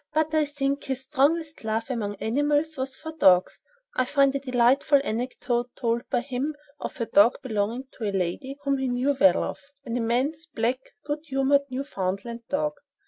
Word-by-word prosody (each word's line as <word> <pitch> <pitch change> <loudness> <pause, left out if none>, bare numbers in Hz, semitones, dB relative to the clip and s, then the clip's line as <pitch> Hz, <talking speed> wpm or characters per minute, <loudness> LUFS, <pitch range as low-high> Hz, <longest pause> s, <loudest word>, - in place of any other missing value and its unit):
But 315 0 +1
I 310 -1 +3
think 280 -1 -2
his 265 -1 -3
strongest 300 +3 0
love, 225 +3 -2
among 210 -4 -2
animals, 290 +8 0
was 260 -1 -3
for 320 +1 -7
dogs. 190 - +4 0.3
I 255 - +3
find 275 +1 +3
a 275 - -1
delightful 260 +2 +3
anecdote 245 0 -2
told 235 0 -1
by 250 -3 +1
him 270 +4 -3 0.2
of - - -6
a 230 - 0
dog 210 +2 +5
belonging 225 +1 -1 0.2
to 215 -3 -1
a - - -2
lady 195 +9 -2
whom 275 -1 +1
he 265 - 0
knew 255 +3 +1
well, 185 -2 +6
"Of," - - -4 0.3
an 235 -1 -3
immense, 260 +8 0
black, 250 -3 -1 0.3
good 295 +1 -2
humored, 280 0 +2
Newfoundland 235 -3 -4
dog. 300 +1 0
260 Hz, 175 wpm, -26 LUFS, 230-285 Hz, 0.3 s, well